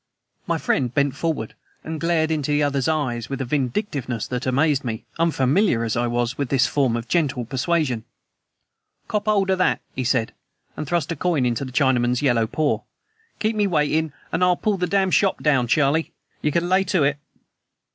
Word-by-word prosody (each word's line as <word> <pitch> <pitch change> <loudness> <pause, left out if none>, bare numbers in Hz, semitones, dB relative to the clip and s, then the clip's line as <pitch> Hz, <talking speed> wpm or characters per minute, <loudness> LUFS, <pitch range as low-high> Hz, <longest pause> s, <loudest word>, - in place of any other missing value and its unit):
My - - +1
friend 125 -3 0
bent 140 0 +1
forward 155 -8 -2 0.3
and 160 -1 -5
glared 165 -1 +1
into 150 -3 -1
the 145 0 +2
other's 140 -2 0
eyes 130 -8 -1
with 135 - -4
a 130 - -2
vindictiveness 130 - -2
that 125 +1 -3
amazed 140 +2 +2
me, 110 -3 -4
unfamiliar 155 - +2
as 115 -2 -1
I 120 +1 +1
was 120 +2 -1
with 140 -3 -1
this 135 -2 +3
form 130 -5 +1
of 115 +1 -6
gentle 140 -8 0
persuasion. 130 -1 0 1.0
"Kop 210 0 -2
'old 200 -2 +2
o' - - +3
that," 185 - +2 0.2
he 130 - -2
said, 120 -2 0 0.4
and 155 - -5
thrust 170 -1 0
a - - -1
coin 160 -4 +1
into 120 +2 0
the 130 - -8
Chinaman's 125 -1 +2
yellow 120 -5 +2
paw. 155 +5 0 0.6
"Keep 220 +1 0
me 205 -1 +2
waitin' 155 -2 +1 0.2
an' - - -1
I'll 180 -1 +4
pull 210 -2 0
the 180 -1 -1
dam' 190 +1 +1
shop 195 +1 +2
down, 135 -5 +3
Charlie. 150 +5 +2 0.3
You 150 - +1
can 170 +3 0
lay 185 +1 +3
to 180 -5 +2
it." 140 +1 +1
145 Hz, 190 wpm, -22 LUFS, 125-170 Hz, 1.0 s, I'll